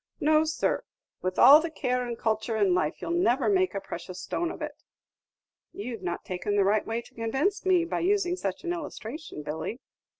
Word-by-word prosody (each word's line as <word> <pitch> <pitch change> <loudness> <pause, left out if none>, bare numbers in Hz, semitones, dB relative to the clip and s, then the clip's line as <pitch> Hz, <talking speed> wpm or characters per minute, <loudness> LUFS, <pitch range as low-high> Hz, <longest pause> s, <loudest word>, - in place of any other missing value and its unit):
No, 310 +1 +4
sir; 315 0 0 0.4
with 185 0 -2
all 285 +5 +9
the 335 - -3
care 250 -5 -1
and 235 -1 -4
culture 220 0 -1
in 200 -4 +3
life, 165 -4 -1
you - - -4
'll - - 0
never 280 -7 +2
make 375 - +2
a - - 0
precious 185 -1 -7
stone 345 - -2
of - - -7
it!" - - -6 0.9
"You've 225 0 -6
not 175 -2 -4
taken 185 +3 -2
the 200 - +4
right 205 +2 +2
way 230 +1 -2
to - - -18
convince 270 - -1
me, 360 -2 +4
by 340 - -2
using 360 0 +1
such 195 - -4
an 345 -1 -1
illustration, 300 - -7
Billy." 160 - -4
245 Hz, 200 wpm, -28 LUFS, 200-335 Hz, 0.9 s, all